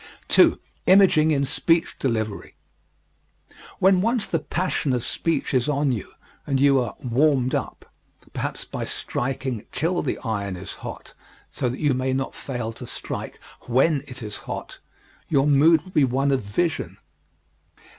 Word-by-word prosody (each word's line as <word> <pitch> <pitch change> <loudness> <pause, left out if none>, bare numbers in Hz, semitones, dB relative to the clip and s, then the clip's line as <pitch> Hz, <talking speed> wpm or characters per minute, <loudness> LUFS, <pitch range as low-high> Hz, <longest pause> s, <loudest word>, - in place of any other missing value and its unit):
2. - - +5 0.3
Imaging 185 -5 +6
in 140 -3 +2
Speech 165 +4 +1
Delivery 110 -5 -2 1.2
When 190 -1 +4
once 230 +1 +1
the 165 - -1
passion 155 -3 -1
of 125 -2 -1
speech 165 -3 -1
is 130 +2 +2
on 145 -1 +1
you 110 -6 -4 0.3
and 135 -2 +1
you 140 -1 +5
are 115 -5 -4
"warmed 130 +1 +2
up" - - -3 0.5
perhaps - - -4
by - - -5
striking 130 -3 -3
till 170 +5 0
the - - -2
iron 100 -5 -2
is 90 +2 -8
hot - - -8 0.4
so 125 - -1
that 125 - -5
you 145 -3 +2
may 130 +1 -1
not 135 0 -2
fail 120 -4 -5
to - - -9
strike - - -6 0.3
when 135 +4 +3
it 125 -2 -9
is 105 -1 -5
hot - - -6 0.5
your 140 -2 +3
mood 150 +2 +5
will 185 - -12
be 150 - +3
one 135 +2 +1
of 135 -2 +1
vision. 145 +12 -2
135 Hz, 155 wpm, -24 LUFS, 125-155 Hz, 1.2 s, Imaging